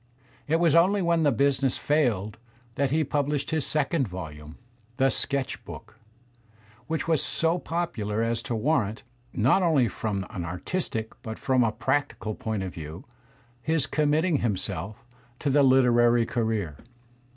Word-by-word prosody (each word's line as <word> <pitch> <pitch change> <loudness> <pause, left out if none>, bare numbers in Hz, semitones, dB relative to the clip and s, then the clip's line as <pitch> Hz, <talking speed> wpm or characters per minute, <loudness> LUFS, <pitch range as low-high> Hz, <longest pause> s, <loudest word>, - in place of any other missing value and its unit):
It 155 - +2
was 165 -2 +3
only 185 +4 +4
when 170 -1 +2
the 145 -2 +4
business 135 +1 +1
failed 115 -9 0 0.3
that 140 +3 0
he 155 +3 +2
published 145 +1 -1
his 160 -2 0
second 150 -2 0
volume, 80 -4 -8 0.4
"The 135 0 +3
Sketch 140 -1 -1
Book," - - -11 0.9
which 160 0 -2
was 160 -4 +2
so 165 +2 +2
popular 115 -12 -2
as 115 0 0
to 120 - 0
warrant, 110 -4 0 0.3
not 130 - +3
only 155 -9 +3
from 100 -4 -3
an 90 - -4
artistic 110 - -3
but 110 -1 -6
from 130 -2 +2
a 115 - +1
prac 135 +6 -1
tical 110 -1 -5
point 110 -6 -2
of 95 - -5
view, 80 +2 -8 0.6
his 160 0 +1
committing 155 +2 +1
himself 110 0 -3 0.3
to 145 - -1
the 145 +2 +4
literary 120 -3 +4
career. 110 - -2
130 Hz, 150 wpm, -26 LUFS, 110-150 Hz, 0.9 s, only